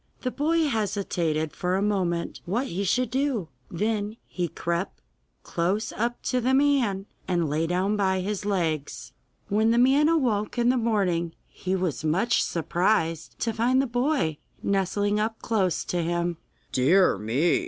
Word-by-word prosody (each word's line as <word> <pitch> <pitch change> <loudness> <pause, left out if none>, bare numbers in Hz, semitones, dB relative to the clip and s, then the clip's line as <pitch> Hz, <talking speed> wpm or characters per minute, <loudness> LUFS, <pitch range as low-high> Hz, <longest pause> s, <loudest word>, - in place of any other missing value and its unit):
The 255 - -2
boy 320 +4 +1
hesitated 180 - -1
for 180 +1 0
a 195 - +1
moment 180 -5 -1
what 230 +9 -1
he 195 -5 -3
should 245 +5 +1
do; 260 - 0 0.2
then 210 +3 -2
he 180 -2 -3
crept 170 +3 -3 0.4
close 190 +6 -1
up 240 +2 -2
to 250 -1 0
the 260 +2 +2
man, 260 -9 +2 0.2
and 175 -3 +1
lay 155 +3 0
down 185 +4 +1
by 190 -2 +1
his 205 +1 -3
legs. 165 -8 -2 0.3
When 215 +2 +2
the 230 - +3
man 270 +5 +5
awoke 240 -11 +1
in 240 0 +3
the 255 - +3
morning 190 -8 0
he 185 +1 -3
was 180 -5 -2
much 180 +10 +2
surprised 170 -1 0
to 230 - 0
find 240 +4 +2
the 270 - +2
boy 245 - 0 0.2
nestling 205 +1 +1
up 220 +1 -1
close 195 -7 0
to 175 - -1
him. 170 0 -1 0.3
'Dear 175 +9 +4
me! 125 +11 +2
200 Hz, 155 wpm, -26 LUFS, 175-235 Hz, 0.4 s, man